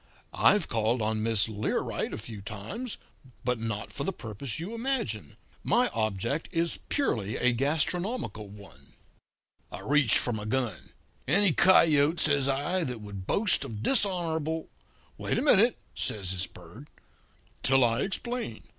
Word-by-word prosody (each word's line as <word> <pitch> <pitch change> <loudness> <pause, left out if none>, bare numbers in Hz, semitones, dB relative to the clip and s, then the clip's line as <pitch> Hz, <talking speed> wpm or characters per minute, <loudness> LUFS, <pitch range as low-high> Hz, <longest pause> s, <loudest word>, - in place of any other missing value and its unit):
I've - - +4
called 115 +2 0
on 110 0 -1
Miss 110 -2 +3
Learight 105 -1 -2
a - - -4
few 110 -1 -7
times; 110 - -5 0.5
but 125 -1 0
not 110 -2 -4
for - - -3
the 195 - -1
purpose 120 - -6
you 180 +7 -5
imagine. 230 - -2 0.3
My 245 +5 +3
object 110 - -2
is 165 0 0
purely 110 - 0
a 125 0 +2
gastronomical 155 - -1
one.' 100 0 -15 0.8
"I - - -7
reached 145 -6 +3
for 120 - 0
my 105 -1 -4
gun. 120 0 -2 0.3
"'Any 190 +4 +4
coyote,' 160 -2 +5
says 145 -3 +3
I, 150 +7 0
'that 125 -6 -5
would 100 -3 -8
boast 205 -8 +3
of 110 -5 -6
dishonourable 165 - 0 0.2
' - - -33
"'Wait - - -1
a - - +1
minute,' 235 -4 +5 0.2
says 95 -4 -2
this 95 0 -1
Bird, 90 - -14 0.7
'till 135 0 +4
I 115 +2 +2
explain. 240 +5 -3
135 Hz, 145 wpm, -28 LUFS, 110-175 Hz, 0.8 s, coyote